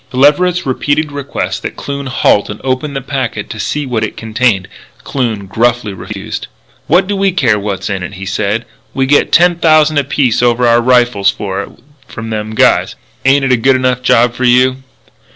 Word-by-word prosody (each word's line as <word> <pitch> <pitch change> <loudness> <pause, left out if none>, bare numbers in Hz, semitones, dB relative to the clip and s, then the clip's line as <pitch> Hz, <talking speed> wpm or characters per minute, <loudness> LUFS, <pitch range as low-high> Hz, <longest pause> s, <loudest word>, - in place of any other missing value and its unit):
To 125 - -7
Leverett's 170 +6 +3
repeated 145 +3 -1
requests 140 -1 -4
that - - -6
Kloon 140 -1 -5
halt 105 -5 +2
and 105 - -6
open 135 +2 -2
the 135 - -2
packet 130 -6 -4
to 110 - -7
see 145 +8 -2
what 120 -4 -2
it 110 - -4
contained, 110 -3 0 0.4
Kloon 115 -7 -2
gruffly 115 +1 0
refused. 95 - -7 0.4
"What 185 +1 +3
do 205 +1 -2
we 195 0 +1
care 125 - +1
what's 100 -1 -4
in 95 -2 -3
it?" 90 +3 -6
he 95 +1 -7
said. 105 +3 -2 0.3
"We 135 - +1
get 145 +2 +2
ten 175 0 +4
thousand 155 -2 +3
apiece 135 -4 0
over 120 0 +2
our 120 0 +4
rifles 120 -5 +3
for 100 -1 -3
it - - -8 0.4
from 115 0 -7
them 110 0 -4
guys. - - +2 0.3
Ain't 135 +1 +4
it 135 - +1
a 125 - +4
good 130 +3 +3
enough 130 -1 0
job 120 -1 +3
for 130 - -5
you?" 125 +1 +3
125 Hz, 190 wpm, -13 LUFS, 110-140 Hz, 0.4 s, ten